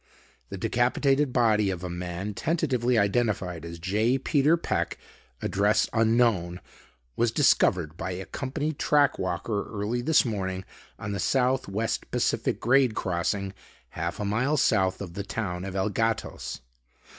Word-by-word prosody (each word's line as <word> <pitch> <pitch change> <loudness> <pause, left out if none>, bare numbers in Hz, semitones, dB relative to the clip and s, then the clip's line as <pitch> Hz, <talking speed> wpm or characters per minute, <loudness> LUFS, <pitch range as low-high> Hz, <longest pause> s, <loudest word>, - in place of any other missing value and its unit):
The 100 - -6
decapitated 135 +6 +1
body 110 -5 +3
of 90 -2 -4
a - - -2
man 90 +3 -4
tentatively 125 - 0
identified 100 -5 0
as 85 0 -7
J. 105 +9 +1
Peter 150 +4 +3
Peck, - - -2 0.5
address 105 +2 +2
unknown, 110 -6 +2 0.6
was 120 - +2
discovered 90 - +3
by 95 - -3
a 95 +1 -6
company 145 +3 -3
track 145 0 +2
walker 95 +3 -2
early 110 +3 -2
this 155 +3 +4
morning 95 -4 -3 0.3
on 105 - -5
the 100 - -3
South 130 0 +1
West 110 +4 -2
Pacific - - 0
grade 125 -1 +3
crossing 95 +2 -1 0.4
half 85 +5 -4
a 105 - -2
mile 125 +9 +1
south 95 -8 +2
of 90 -4 -6
the 100 - -4
town 95 -3 -4
of 95 -1 -6
El 95 +2 +1
Gatos. 115 - -2
105 Hz, 145 wpm, -27 LUFS, 95-125 Hz, 0.6 s, this